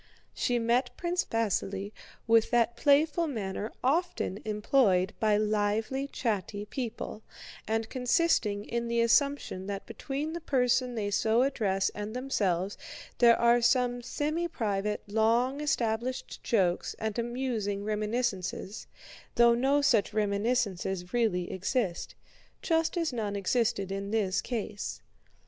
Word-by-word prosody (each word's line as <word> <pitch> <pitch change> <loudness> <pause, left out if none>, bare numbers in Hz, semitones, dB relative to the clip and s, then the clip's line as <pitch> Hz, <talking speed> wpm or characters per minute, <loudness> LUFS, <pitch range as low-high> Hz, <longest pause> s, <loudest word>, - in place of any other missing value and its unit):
She 245 - 0
met 240 +2 +1
Prince 350 +1 -1
Vasíli 200 -3 -1 0.3
with 225 -1 +4
that 235 -1 +2
playful 300 +5 +3
manner 215 -4 -4
often 325 - 0
employed 210 -3 +2
by 215 -1 +3
lively 215 +5 0
chatty 205 -5 -3
people, 230 -2 -5 0.5
and 225 0 0
consisting 245 -5 +1
in 235 0 -2
the 235 0 0
assumption 235 -5 +1
that 200 -1 -4
between 295 +3 -4
the 340 - -5
person 250 -3 +1
they 205 -2 -2
so 225 +4 +3
address 200 -8 +1
and 210 +2 -6
themselves 200 -8 -1 0.4
there 235 -1 +6
are 235 0 +4
some 245 0 +2
semi 305 +7 -2
private, 210 -8 -2
long 230 +6 +1
established 245 -3 -2
jokes 185 -6 +1
and 220 +1 -3
amusing 235 -4 -2
reminiscences, 210 -2 -2 0.5
though 235 0 +6
no 270 +4 +2
such 225 -7 +3
reminiscences 200 -4 -1
really 215 -7 +1
exist—just 255 - -2
as 330 -5 0
none 210 -4 -2
existed 200 0 0
in 195 0 -4
this 200 -3 +1
case. 215 -4 -4
230 Hz, 120 wpm, -29 LUFS, 205-255 Hz, 0.5 s, there